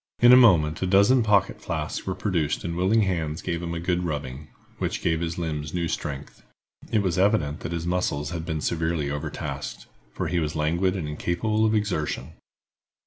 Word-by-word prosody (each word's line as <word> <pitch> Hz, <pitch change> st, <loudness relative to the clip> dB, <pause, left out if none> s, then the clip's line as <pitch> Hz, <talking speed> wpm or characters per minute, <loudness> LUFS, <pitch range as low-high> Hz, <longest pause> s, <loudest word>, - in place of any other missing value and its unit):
In 120 Hz, +1 st, +8 dB
a -, -, +11 dB
moment 85 Hz, -11 st, +5 dB
a 95 Hz, -, 0 dB
dozen 100 Hz, +7 st, +5 dB
pocket 105 Hz, -4 st, +2 dB
flasks -, -, -4 dB
were 95 Hz, -, -1 dB
produced 85 Hz, -8 st, -1 dB
and 85 Hz, 0 st, -3 dB
willing 95 Hz, +5 st, +3 dB
hands 85 Hz, -5 st, -1 dB
gave 85 Hz, -2 st, -2 dB
him 85 Hz, -1 st, -4 dB
a -, -, -3 dB
good 90 Hz, +1 st, 0 dB
rubbing, 75 Hz, -3 st, -4 dB, 0.3 s
which -, -, -2 dB
gave 80 Hz, 0 st, +1 dB
his 85 Hz, 0 st, -3 dB
limbs 75 Hz, -2 st, -3 dB
new 85 Hz, -1 st, 0 dB
strength. 70 Hz, -2 st, -5 dB, 0.5 s
It 105 Hz, -, +2 dB
was 90 Hz, -2 st, 0 dB
evident 80 Hz, -7 st, +2 dB
that -, -, -5 dB
his 85 Hz, -1 st, -3 dB
muscles 85 Hz, -5 st, -1 dB
had 85 Hz, -2 st, -4 dB
been 80 Hz, -2 st, -3 dB
severely 80 Hz, -3 st, -1 dB
overtasked, 75 Hz, +1 st, -5 dB, 0.3 s
for -, -, -3 dB
he 90 Hz, -, 0 dB
was 75 Hz, -1 st, -2 dB
languid 85 Hz, +5 st, +1 dB
and 85 Hz, -6 st, -3 dB
incapable 105 Hz, +8 st, 0 dB
of 110 Hz, -, +1 dB
exertion. 90 Hz, -11 st, -2 dB
85 Hz, 190 wpm, -25 LUFS, 75-95 Hz, 0.5 s, a